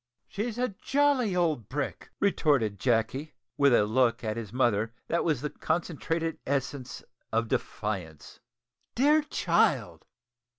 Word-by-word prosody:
"She's 220 +3 -4
a 250 +1 +1
jolly 275 -8 +2
old 155 - 0
brick," 145 +2 -4
retorted 140 - +2
Jacky, 130 +5 0 0.2
with 140 -1 +4
a 110 -3 +5
look 115 +2 +2
at 110 -1 -2
his 115 -4 -6
mother 115 -2 +1
that 170 - +1
was 150 -7 0
the 150 - -3
concentrated 165 0 -2
essence 135 -1 -3 0.3
of 115 +1 +1
defiance. 95 -10 -4 0.6
"Dear 295 +5 +4
child!" 300 - +1
140 Hz, 125 wpm, -28 LUFS, 115-170 Hz, 0.6 s, a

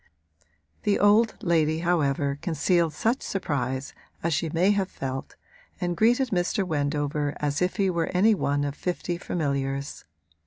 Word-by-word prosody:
The 205 - +2
old 210 +3 +4
lady 160 -4 +2
however 145 -5 +1
concealed 170 0 +1
such 230 - 0
surprise 135 -7 -2 0.3
as 170 0 +1
she 160 +2 0
may 175 +5 +3
have 195 -2 0
felt, 135 0 -5 0.4
and 175 -1 -1
greeted 240 +6 +3
Mr. 180 +1 0
Wendover 145 -2 -1
as 145 +1 -1
if 180 0 +1
he 200 -2 +2
were 170 -3 0
any 205 +5 +4
one 145 -7 0
of 145 -1 -2
fifty 175 +1 -3
familiars. 140 -4 -3
165 Hz, 145 wpm, -26 LUFS, 145-185 Hz, 0.4 s, old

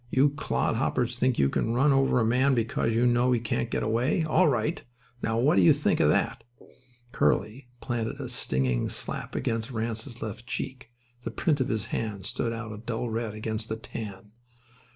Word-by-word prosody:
You 140 +3 +4
clodhoppers 125 -3 0
think 125 0 +1
you 70 - +4
can 115 +11 0
run 140 +3 +4
over 135 -2 +3
a 110 - +2
man 130 +4 +3
because 115 -1 0
you 120 +2 +3
know 120 +1 +3
he 120 - +2
can't 105 - -2
get - - -1
away. 120 - +1
All 155 0 +3
right. 120 -6 0 0.4
Now, 115 0 0
what 125 -1 +3
do - - +6
you 85 - +7
think - - +1
of - - +4
that?" - - +1 0.7
Curly 120 +5 0
planted 120 -3 -3
a - - -4
stinging 65 -2 0
slap - - -4
against 115 +1 -1
Ranse's 115 +1 -4
left 110 +2 -6
cheek. 130 -2 -5 0.3
The - - -4
print 150 -5 0
of 130 - +1
his 110 -1 -1
hand 105 -4 -3
stood 115 0 -1
out 115 -1 -5
a 105 - -8
dull 115 +1 -3
red 110 -1 -3
against 110 0 -3
the 110 - -2
tan. 105 -2 -8
115 Hz, 190 wpm, -27 LUFS, 110-125 Hz, 0.7 s, you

